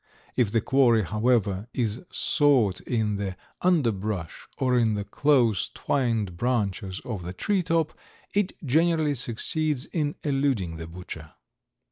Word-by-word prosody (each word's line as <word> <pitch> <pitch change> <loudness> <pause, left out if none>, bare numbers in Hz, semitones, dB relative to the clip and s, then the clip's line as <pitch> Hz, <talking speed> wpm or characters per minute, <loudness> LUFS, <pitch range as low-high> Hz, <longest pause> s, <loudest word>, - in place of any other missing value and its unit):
If 115 -5 +2
the 115 - +2
quarry, 120 -4 +4
however, 105 -1 +1
is 115 -1 -1
sought 130 - +3
in 110 -4 -1
the 95 -2 -4 0.2
underbrush 110 - 0
or 130 -1 +2
in 115 -3 +3
the 100 - -2
close 120 -4 +2
twined 115 -9 0
branches 100 -5 -1
of 110 -7 -4
the 90 +1 -6
treetop, 165 - 0 0.4
it 205 -2 +1
generally 160 +2 +3
succeeds 140 +3 -1
in 150 -3 -2
eluding 135 - 0
the 80 0 -7
butcher. 80 -2 -9
120 Hz, 125 wpm, -26 LUFS, 100-145 Hz, 0.4 s, quarry